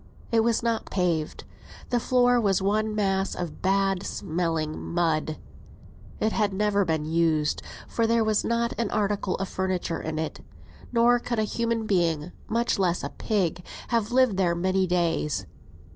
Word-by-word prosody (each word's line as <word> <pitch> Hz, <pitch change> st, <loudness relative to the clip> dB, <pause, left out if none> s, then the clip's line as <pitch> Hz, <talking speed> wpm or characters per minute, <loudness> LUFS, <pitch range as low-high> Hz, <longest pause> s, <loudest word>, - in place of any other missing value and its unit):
It 230 Hz, -, +4 dB
was 230 Hz, -1 st, +1 dB
not 230 Hz, -1 st, -1 dB
paved; 170 Hz, -5 st, -1 dB, 0.5 s
the 245 Hz, -, +3 dB
floor 245 Hz, 0 st, +3 dB
was 195 Hz, -4 st, +2 dB
one 215 Hz, +2 st, 0 dB
mass 195 Hz, -2 st, 0 dB
of 170 Hz, -4 st, -5 dB
bad 195 Hz, 0 st, +2 dB
smelling 165 Hz, -4 st, -2 dB
mud. 160 Hz, -2 st, 0 dB, 0.8 s
It 220 Hz, -, +1 dB
had 210 Hz, -3 st, +1 dB
never 205 Hz, 0 st, +2 dB
been 160 Hz, -4 st, -1 dB
used, 160 Hz, -2 st, +1 dB, 0.3 s
for 230 Hz, -1 st, 0 dB
there 230 Hz, 0 st, +3 dB
was 215 Hz, -1 st, +1 dB
not 235 Hz, 0 st, 0 dB
an 230 Hz, -3 st, 0 dB
article 200 Hz, -2 st, 0 dB
of 195 Hz, -, -3 dB
furniture 185 Hz, -3 st, -2 dB
in 155 Hz, 0 st, -4 dB
it; 160 Hz, 0 st, -4 dB, 0.5 s
nor 240 Hz, 0 st, +4 dB
could 240 Hz, 0 st, -3 dB
a 215 Hz, -, +2 dB
human 230 Hz, +1 st, -1 dB
being, 170 Hz, -5 st, +1 dB, 0.2 s
much 235 Hz, -1 st, 0 dB
less 180 Hz, -2 st, +1 dB
a -, -, -3 dB
pig, 185 Hz, -5 st, -1 dB, 0.3 s
have 230 Hz, -2 st, 0 dB
lived 250 Hz, -5 st, +3 dB
there 175 Hz, -3 st, +2 dB
many 185 Hz, +2 st, +1 dB
days. 165 Hz, -, 0 dB
195 Hz, 160 wpm, -26 LUFS, 170-225 Hz, 0.8 s, It